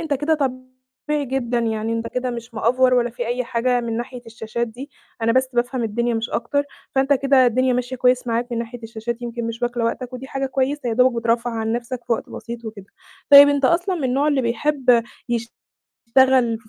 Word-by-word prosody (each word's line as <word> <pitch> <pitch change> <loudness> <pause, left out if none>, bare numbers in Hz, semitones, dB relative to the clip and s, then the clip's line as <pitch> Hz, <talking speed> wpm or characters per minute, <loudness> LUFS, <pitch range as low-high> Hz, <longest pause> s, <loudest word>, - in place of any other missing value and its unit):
أنت 315 -3 -1
كده 295 +4 +1
طبيعي 255 +1 -4
جدًا، 245 -2 -1
يعني 225 -1 -1
أنت 230 0 -2
كده 250 0 -2
مش 235 0 -8
مأفور 255 +3 +3
ولا 240 -1 +2
في 240 0 -5
أي 245 +1 -1
حاجة 245 +1 0
من 230 -1 -3
ناحية 245 +1 -6
الشاشات 225 +1 -4
دي، 260 +6 -10 0.3
أنا 230 0 +3
بس 260 +1 +2
بافهم 245 +1 -1
الدنيا 235 +2 -1
مش 225 +1 -2
أكتر، 285 +5 0 0.3
فأنت 270 +1 +3
كده 270 -1 +4
الدنيا 255 +2 +2
ماشية 250 +1 -2
كويس 250 0 +2
معاك 240 +1 -1
من 230 - -1
ناحية 235 0 -6
الشاشات، 230 +2 -5
يمكن 235 -1 -4
مش 230 +1 -6
واكلة 240 -1 -1
وقتك 250 +2 -3
ودي 255 +1 -7
حاجة 270 0 -3
كويسة 265 0 -1
يا - - 0
دوبك 250 -1 +3
بترفّه 230 +1 +1
عن 225 -1 -2
نَفْسك 240 +1 -4
في 235 - +1
وقت - - -2
بسيط 235 +1 -8
وكده، 215 -3 -8 0.4
طيب 285 0 +11
أنت 285 -1 +1
أصلًا 350 +6 +2
من 305 -6 -3
النوع 270 +4 +1
اللي 280 -3 +1
بيحب 245 0 +2 0.8
يشتغل 250 -2 +2
في 220 -2 -23
245 Hz, 205 wpm, -21 LUFS, 230-260 Hz, 0.8 s, طيب